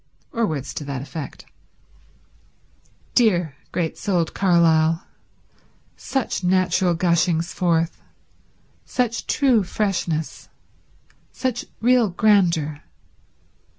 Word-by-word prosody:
Or 230 -2 +1
words 140 -4 -4
to - - -5
that 135 -2 -4
effect. 150 0 -8 1.7
Dear, 180 - +2 0.2
great 165 -3 -2
souled 180 -5 0
Carlyle. 165 -3 +3 0.9
Such 265 -7 -3
natural 185 -1 +2
gushings 170 -1 +1
forth; 165 -2 0 0.8
such 240 -3 -2
true 260 -6 +3
freshness; 175 -5 -2 0.8
such 255 -2 -3 0.2
real 240 -2 +4
grandeur. 170 -7 +2
175 Hz, 85 wpm, -22 LUFS, 160-215 Hz, 1.7 s, real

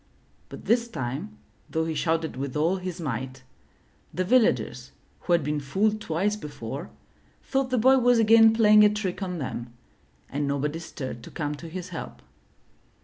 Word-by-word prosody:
But - - -10
this 235 +1 +2
time, 160 - -5 0.3
though 160 0 -1
he 160 - -2
shouted 160 -1 -1
with 135 +1 -4
all 165 +5 +2
his 185 -1 -6
might, 130 -3 -4 0.7
the 185 - -1
villagers 135 - +1 0.3
who 175 - -1
had 170 -3 +3
been 150 +1 -1
fooled 210 +10 0
twice 195 +4 0
before, 145 - -7 0.5
thought 270 -1 -1
the 255 - +1
boy 260 +3 +5
was 245 -1 +4
again 225 0 +7
playing 215 -1 +6
a 210 - +7
trick 210 -3 -3
on 180 -2 -3
them, 120 -4 -5 0.5
and 145 +1 -2
nobody 145 +3 -1
stirred 130 -7 -7
to - - -11
come 150 -1 -3
to 165 +3 -9
his 185 +2 -6
help. 170 - -8
170 Hz, 165 wpm, -26 LUFS, 140-210 Hz, 0.7 s, again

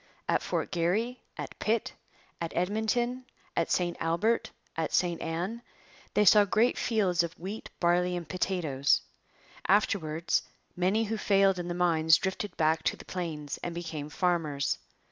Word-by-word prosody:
At - - +2
Fort - - -2
Garry, 205 +9 0 0.2
at - - -7
Pitt, 220 0 0 0.5
at 170 - -2
Edmonton, 220 +7 0 0.3
at 165 - +1
St 175 -1 +1
Albert, 170 +8 +1 0.3
at 160 -1 -1
St 175 -2 +1
Ann, 175 +8 -3 0.5
they 210 - +4
saw 205 +2 +8
great 220 +5 +2
fields 195 -7 +2
of 170 -1 -3
wheat, 195 +6 -6
barley, 180 +1 +2
and 170 -3 -6
potatoes. 160 -6 +1 0.7
Afterwards 170 -5 +2 0.3
many 190 +5 +2
who 220 0 -2
failed 195 -2 +3
in 175 - -4
the 175 - -3
mines 160 -2 +4
drifted 190 0 -3
back 160 0 +2
to - - +1
the - - -12
plains 160 -5 -4
and 170 -1 -4
became 160 -4 -5
farmers. 155 -5 0
180 Hz, 145 wpm, -29 LUFS, 165-205 Hz, 0.7 s, saw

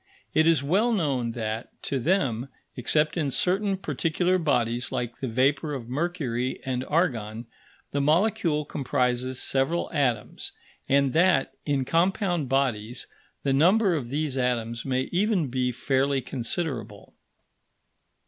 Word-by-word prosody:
It 155 +1 +4
is 165 -4 +4
well 200 +11 +2
known 135 - 0
that, 110 -1 -4
to 135 - -1
them, 135 - 0 0.3
except 150 +7 +1
in 150 -4 0
certain 195 +7 0
particular 175 +2 0
bodies 120 -6 0
like 125 -2 -3
the 130 - -3
vapour 135 +5 +1
of 120 -3 -7
mercury 130 -5 -2
and 130 -1 -1
argon, 120 -9 -1 0.5
the 140 - 0
molecule 155 -1 +2
comprises 130 -2 -1
several 135 +6 0
atoms, 125 -8 -1 0.4
and 140 -1 +3
that, 165 -6 +3
in 140 -3 0
compound 175 - +1
bodies, 125 -4 -1 0.4
the 135 - +1
number 185 +7 +4
of 135 -7 -3
these 145 0 -2
atoms 115 -2 -1
may 130 -1 0
even 185 - +1
be 125 0 0
fairly 135 +2 +1
considerable. 120 - -4
135 Hz, 130 wpm, -26 LUFS, 125-165 Hz, 0.5 s, It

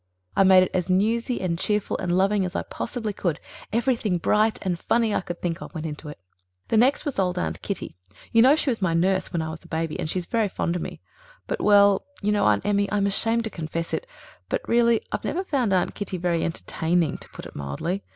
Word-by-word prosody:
I - - +4
made 190 -1 +7
it 185 - -2
as 180 -1 -1
newsy 225 +6 +1
and 170 -3 -1
cheerful 210 0 0
and 180 -2 -2
loving 195 +2 +3
as 180 +1 -4
I - - -1
possibly 225 -4 -4
could. 175 -5 -2 0.3
Everything 230 -4 +1
bright 215 +6 +2
and 175 -2 -1
funny 230 +1 +1
I - - +1
could 175 -1 -7
think 175 +1 -2
of - - -9
went 160 0 -4
into 150 0 -6
it. 150 - -9 0.5
"The 225 - +3
next 255 +5 +3
was 285 -8 -2
old 180 -1 +1
Aunt - - -2
Kitty. 200 -3 -4 0.4
You 230 - +5
know 265 +5 +7
she 305 -3 +1
was 225 - -3
my 175 -3 +1
nurse 185 +3 +1
when 165 -2 -1
I 160 - -4
was 160 - -9
a - - -15
baby, 160 -1 -3
and 155 - -2
she's 180 +1 -2
very 220 +2 0
fond 175 -2 -2
of 175 - -2
me. - - -7 0.4
But, - - -3
well, 200 -1 +5 0.2
you 210 - +2
know, 210 - +2
Aunt 105 -1 +2
Emmy, 200 -1 +1
I'm 205 -1 +1
ashamed 225 +3 +1
to 220 - -3
confess 165 0 -4
it, - - -2 0.4
but - - -2
really 235 -1 +4
I've - - -3
never 365 +4 -1
found 265 - 0
Aunt 185 -2 +1
Kitty 200 -2 -4
very 170 -1 0
entertaining, 165 -1 -1
to - - -12
put - - -10
it - - -11
mildly. 70 - -3
190 Hz, 235 wpm, -25 LUFS, 170-220 Hz, 0.5 s, made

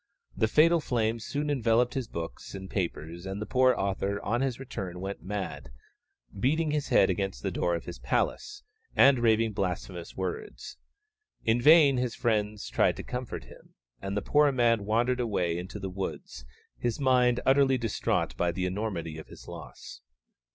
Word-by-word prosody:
The 110 - +2
fatal 165 +8 +5
flame 115 -4 0
soon 145 +6 -2
enveloped 120 -2 +2
his 130 -4 -3
books 80 - -7
and 95 0 -7
papers, 85 -1 -4
and 95 +1 -4
the 105 - -3
poor 130 +1 +3
author 100 +1 -1
on 120 +4 0
his 130 -3 -1
return 95 -9 -6
went 95 +2 -5
mad, 90 -8 -5 0.7
beating 155 +7 +1
his 150 -1 -1
head 95 - +4
against 95 -9 -3
the - - -1
door 85 -1 0
of 85 - -5
his - - -8
palace, 410 -1 -2 0.3
and 135 -2 +6
raving 115 -1 +3
blasphemous 90 -2 -4
words. 95 -1 -5 0.7
In 115 +2 +2
vain 150 -1 +7
his 125 -2 -1
friends 105 -2 -1
tried - - +2
to - - -6
comfort 125 -1 -5
him, - - -17 0.3
and 100 +1 -3
the 100 - -1
poor 145 -1 +4
man 115 -5 +2
wandered 120 +3 +1
away 95 -8 0
into 90 +4 -6
the 95 -1 -5
woods, 90 -9 -6 0.3
his 120 +2 -1
mind 125 -2 +3
utterly 135 -1 +4
distraught 115 -3 -1
by 90 0 +1
the 90 +2 -2
enormity 90 -5 -3
of 80 - -10
his - - -13
loss. - - -10
110 Hz, 170 wpm, -28 LUFS, 95-125 Hz, 0.7 s, vain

